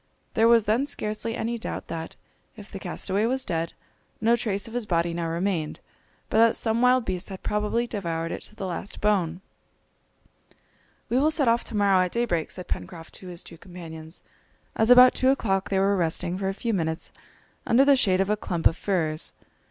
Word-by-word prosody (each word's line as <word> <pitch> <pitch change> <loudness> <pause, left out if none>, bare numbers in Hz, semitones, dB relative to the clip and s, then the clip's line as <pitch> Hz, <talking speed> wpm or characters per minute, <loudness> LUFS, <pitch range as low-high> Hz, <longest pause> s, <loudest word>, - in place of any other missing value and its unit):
There 225 +1 +4
was 230 -1 +6
then 225 +7 +1
scarcely 220 -3 -3
any 235 0 -2
doubt - - -5
that, 165 0 -6 0.4
if 210 -2 -12
the 195 - -6
castaway 190 +4 -1
was 260 +2 0
dead, 165 -2 -2 0.5
no 230 +2 +4
trace 205 -3 -2
of 225 - -10
his 240 -3 -3
body 170 -2 +1
now 170 0 -2
remained, 170 -1 -2 0.5
but 220 - +1
that 230 0 +5
some 225 0 0
wild 250 -1 +4
beast 185 +1 -3
had 190 -1 -8
probably 210 +3 0
devoured 165 -7 -3
it - - -5
to 215 - -15
the 195 - -5
last 185 +2 -5
bone. 185 -5 +1 1.7
"We 245 - +1
will 300 +3 +4
set 300 -4 +1
off 230 +1 +3
to 215 - -4
morrow 200 -2 +4
at 180 - -3
daybreak," 225 -9 0
said 180 - -8
Pencroft 165 -2 -6
to 185 - -10
his 175 -1 -6
two 165 - -12
companions, 165 -3 -9 0.5
as 220 +1 +2
about 250 0 +9
two 260 - +2
o'clock 195 -8 +1
they 195 - +1
were 195 +1 +3
resting 170 0 0
for 190 0 -2
a - - -2
few 230 +1 -2
minutes 160 -3 -2 0.6
under 260 +4 +5
the 280 0 +6
shade 190 -7 +3
of 195 - 0
a - - +3
clump 175 -5 -4
of 160 - +5
firs. 160 -6 -1
200 Hz, 200 wpm, -25 LUFS, 175-230 Hz, 1.7 s, about